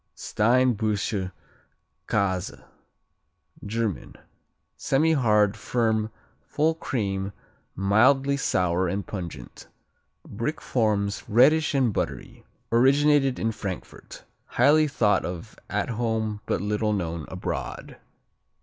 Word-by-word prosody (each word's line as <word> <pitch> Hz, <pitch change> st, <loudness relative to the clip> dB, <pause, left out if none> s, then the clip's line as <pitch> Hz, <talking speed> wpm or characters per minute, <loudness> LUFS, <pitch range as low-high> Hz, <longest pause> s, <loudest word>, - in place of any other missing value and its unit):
Steinbuscher 110 Hz, -4 st, +1 dB, 0.8 s
Käse 95 Hz, -3 st, -1 dB, 1.0 s
German 110 Hz, -3 st, -3 dB, 0.6 s
Semihard; 125 Hz, -9 st, +2 dB
firm; 110 Hz, -1 st, 0 dB, 0.3 s
full 155 Hz, +2 st, 0 dB
cream; 100 Hz, -, -3 dB, 0.4 s
mildly 130 Hz, +9 st, +3 dB
sour 90 Hz, -8 st, +1 dB
and 100 Hz, +3 st, -2 dB
pungent. 85 Hz, -, -8 dB, 0.6 s
Brick 115 Hz, +9 st, -3 dB
forms, 105 Hz, -4 st, 0 dB
reddish 145 Hz, +7 st, +4 dB
and 130 Hz, -6 st, +2 dB
buttery. -, -, -4 dB, 0.3 s
Originated 135 Hz, +2 st, +4 dB
in 115 Hz, -, 0 dB
Frankfurt. 100 Hz, -4 st, -8 dB, 0.2 s
Highly 155 Hz, +1 st, +4 dB
thought 105 Hz, -8 st, +2 dB
of 85 Hz, -1 st, -6 dB
at -, -, -1 dB
home 110 Hz, -2 st, -2 dB
but -, -, 0 dB
little 105 Hz, +1 st, 0 dB
known 85 Hz, -5 st, -3 dB
abroad. -, -, -5 dB
110 Hz, 90 wpm, -25 LUFS, 100-130 Hz, 1.0 s, reddish